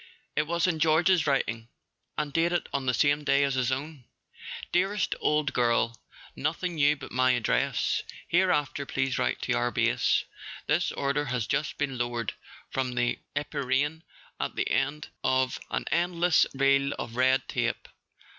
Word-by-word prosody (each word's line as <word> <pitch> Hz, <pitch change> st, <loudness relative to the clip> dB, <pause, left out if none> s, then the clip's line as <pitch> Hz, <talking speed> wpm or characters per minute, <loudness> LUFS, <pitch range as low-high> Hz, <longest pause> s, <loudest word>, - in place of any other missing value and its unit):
It 150 Hz, -, +1 dB
was 170 Hz, 0 st, +1 dB
in 170 Hz, -4 st, 0 dB
George's 165 Hz, +2 st, +3 dB
writing, 115 Hz, -5 st, 0 dB, 0.5 s
and 150 Hz, -2 st, -2 dB
dated 170 Hz, +1 st, +1 dB
on 135 Hz, -2 st, -2 dB
the 125 Hz, -, +3 dB
same 145 Hz, 0 st, +2 dB
day 140 Hz, 0 st, +3 dB
as 140 Hz, -1 st, +1 dB
his 130 Hz, -1 st, 0 dB
own. 140 Hz, 0 st, -4 dB, 0.7 s
"Dearest 195 Hz, +3 st, +1 dB
old 150 Hz, -1 st, +1 dB
girl, 120 Hz, -1 st, +2 dB, 0.4 s
nothing 180 Hz, -1 st, -2 dB
new 150 Hz, -2 st, +3 dB
but 140 Hz, -, -10 dB
my 130 Hz, 0 st, +3 dB
address. 120 Hz, -3 st, +1 dB, 0.3 s
Hereafter 150 Hz, -6 st, +1 dB
please 130 Hz, -2 st, -1 dB
write 60 Hz, +1 st, -1 dB
to -, -, 0 dB
our -, -, +1 dB
Base. -, -, +2 dB, 0.4 s
This -, -, +1 dB
order 140 Hz, +1 st, 0 dB
has 125 Hz, -4 st, -1 dB
just 150 Hz, -, -1 dB
been 135 Hz, -4 st, -2 dB
lowered 120 Hz, -3 st, -2 dB, 0.4 s
from 130 Hz, -1 st, -1 dB
the 120 Hz, 0 st, 0 dB, 0.2 s
empyrean 145 Hz, +2 st, -1 dB, 0.4 s
at -, -, -3 dB
the -, -, -1 dB
end 145 Hz, +2 st, -1 dB
of 130 Hz, 0 st, +1 dB
an -, -, -2 dB
end¬ 170 Hz, +1 st, 0 dB
less 175 Hz, -2 st, +4 dB
reel 140 Hz, +1 st, +3 dB
of 115 Hz, -, -6 dB
red 130 Hz, +1 st, +3 dB
tape. -, -, -2 dB
140 Hz, 155 wpm, -28 LUFS, 130-155 Hz, 0.7 s, less